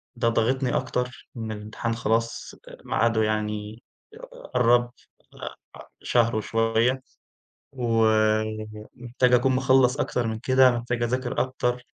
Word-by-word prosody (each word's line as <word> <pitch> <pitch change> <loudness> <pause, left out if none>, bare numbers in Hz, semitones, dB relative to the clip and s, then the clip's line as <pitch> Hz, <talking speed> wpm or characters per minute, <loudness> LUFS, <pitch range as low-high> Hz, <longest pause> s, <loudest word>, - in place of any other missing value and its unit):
ده 120 -1 +1
ضاغطني 125 +3 0
أكتر 125 0 -4
إن 110 -1 -4
الامتحان 110 +2 -4
خلاص 115 0 -2
آآ - - -11
ميعاده 110 0 +1
يعني 105 +1 -3 0.3
ق 455 - -13
ق - - -14
قرّب، 120 0 +3 0.4
أ - - -9 0.3
أ - - -12 0.2
شهر 115 -2 +2
وشوية، 115 +4 +1 0.7
و 115 -4 +1 0.9
محتاج 125 +1 +1
أكون 130 +2 +3
مخلّص 130 +1 +3
أكتر 125 -4 -1
من 110 -1 -3
كده، 130 +2 +4
محتاج 120 0 -2
أذاكر 125 +1 -1
أكتر 125 -1 -1
120 Hz, 130 wpm, -25 LUFS, 115-130 Hz, 0.9 s, كده